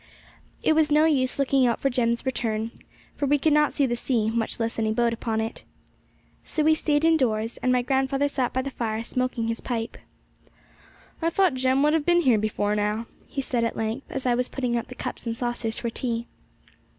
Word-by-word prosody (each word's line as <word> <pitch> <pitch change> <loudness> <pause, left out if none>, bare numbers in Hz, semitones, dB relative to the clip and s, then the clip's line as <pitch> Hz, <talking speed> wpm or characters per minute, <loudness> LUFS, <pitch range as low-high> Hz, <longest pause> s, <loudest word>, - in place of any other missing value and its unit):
It - - +4
was 310 -1 +3
no 300 +1 +5
use 260 -5 +2
looking 275 -2 +3
out 235 - 0
for 275 - +1
Jem's 235 -1 0
return, 225 -3 -1 0.4
for 285 - -1
we 290 +2 +4
could 300 +2 +2
not 300 0 +4
see 280 - +1
the 240 -2 0
sea, 230 -3 0
much 225 0 -1
less 230 0 -2
any 220 -1 +1
boat 235 +1 +1
upon 225 -1 -2
it. 225 +1 -4 0.8
So 310 - -1
we 315 +1 +5
stayed 305 -1 +1
indoors, 235 -9 +2
and 255 - 0
my 250 -1 +2
grandfather 270 +2 +1
sat 260 -3 -1
by 260 - -1
the 275 - -4
fire 225 -3 -3
smoking 250 -1 -2
his 230 0 -2
pipe. 230 -2 -4 1.2
'I 330 - +2
thought 370 -1 +2
Jem 260 +1 +2
would 300 +1 +4
have 320 -2 +2
been 345 0 +5
here 245 -8 +4
before 210 -1 0
now,' 210 +2 -1 0.2
he 275 - -4
said 240 -3 0
at 230 - -1
length, 225 +5 -3
as 270 -1 -4
I 250 - +3
was 250 +1 0
putting 250 -3 -2
out 235 - -2
the 255 - -10
cups - - -5
and 230 0 -2
saucers 240 -2 -2
for 235 - -3
tea. 235 -1 -2
250 Hz, 210 wpm, -25 LUFS, 230-275 Hz, 1.2 s, no